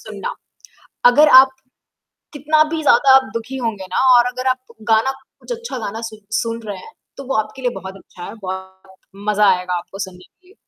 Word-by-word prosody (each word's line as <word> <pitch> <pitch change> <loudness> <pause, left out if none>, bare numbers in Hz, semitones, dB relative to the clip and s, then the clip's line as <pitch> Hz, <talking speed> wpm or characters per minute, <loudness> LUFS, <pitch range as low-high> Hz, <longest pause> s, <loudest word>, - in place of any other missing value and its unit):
सुनना। - - -7 0.8
अगर 300 +3 +5
आप 270 - -1 0.8
कितना 305 +2 +2
भी 315 - -2
ज़्यादा 265 -1 +5
आप 265 0 +1
दुखी 230 +4 -5
होंगे 205 -4 -4
ना, - - -1 0.2
और 240 0 +4
अगर 255 +1 -6
आप 255 - +1 0.3
गाना 225 +5 +3 0.3
कुछ - - -7
अच्छा 470 - -6
गाना 220 0 -5
सु 215 - -12 0.3
सुन 230 0 -4
रहे 200 -2 -5
हैं 450 - -13 0.2
तो 275 - -8
वो 270 - 0
आपके 215 +4 -4
लिए 245 - +1
बहुत 190 +1 -9
अच्छा 180 -2 -13
है। 200 - -8
बहुत 190 0 -8 0.4
मज़ा 210 -1 +4
आएगा 180 0 -4
आपको 180 +3 -6
सुनने 185 -2 -7
के 365 - -28
लिए। 390 - -21
225 Hz, 195 wpm, -19 LUFS, 190-265 Hz, 0.8 s, अगर